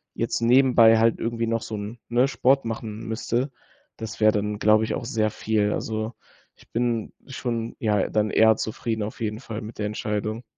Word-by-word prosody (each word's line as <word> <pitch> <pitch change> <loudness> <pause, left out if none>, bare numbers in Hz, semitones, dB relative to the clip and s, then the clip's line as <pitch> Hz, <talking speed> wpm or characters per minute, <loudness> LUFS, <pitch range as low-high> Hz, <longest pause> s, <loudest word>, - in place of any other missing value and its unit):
jetzt - - -1
nebenbei 120 -2 +6
halt 115 0 +3
irgendwie 115 0 -2
noch 115 0 0
so 110 - -5
'n, 105 +3 -6
ne, 125 +3 +3
Sport 135 +1 +2
machen 110 0 -5
müsste, 120 +4 -1 0.5
das 110 -1 -7
wäre 110 0 +5
dann, 105 0 -2
glaube 110 +1 +4
ich, - - -2
auch 125 - -5
sehr 110 -1 0
viel. 105 -1 0
Also, 110 +1 -3 0.4
ich - - -22
bin 115 -2 -1
schon 120 -3 -4
ja 105 -3 +1
dann 105 0 +1
eher 110 0 +5
zufrieden 110 0 -3
auf 110 +2 -7
jeden 110 0 -2
Fall 115 -4 -6
mit 110 +2 -9
der 105 - -1
Entscheidung. 105 +2 -3
110 Hz, 185 wpm, -24 LUFS, 110-115 Hz, 0.5 s, nebenbei